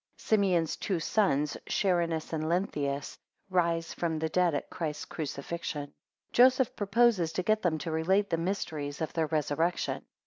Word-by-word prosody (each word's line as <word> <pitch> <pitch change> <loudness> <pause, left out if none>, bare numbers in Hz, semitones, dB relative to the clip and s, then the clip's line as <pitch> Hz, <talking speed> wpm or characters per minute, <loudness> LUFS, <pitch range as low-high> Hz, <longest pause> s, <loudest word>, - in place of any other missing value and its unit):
16 - - -16
Simeon's 185 -7 +3
two 185 -4 -1
sons, 150 -6 +1
Charinus 170 -5 0
and 155 0 -1
Lenthius, 145 -6 -1 0.3
rise 170 -2 +1
from 165 -2 -1
the 160 +1 -1
dead 175 -1 +2
at 145 - -4
Christ's 155 -3 -4
crucifixion. 150 +1 -4
19 145 0 -10 0.4
Joseph 255 0 +5
proposes 205 -4 +3
to 185 - -1
get 215 +3 +2
them 165 -3 +1
to 160 +2 -4
relate 190 +6 +1
the 165 - +2
mysteries 160 -5 -3
of 160 - -3
their 160 -2 0
resurrection. 160 +3 0
165 Hz, 160 wpm, -30 LUFS, 155-190 Hz, 0.4 s, Joseph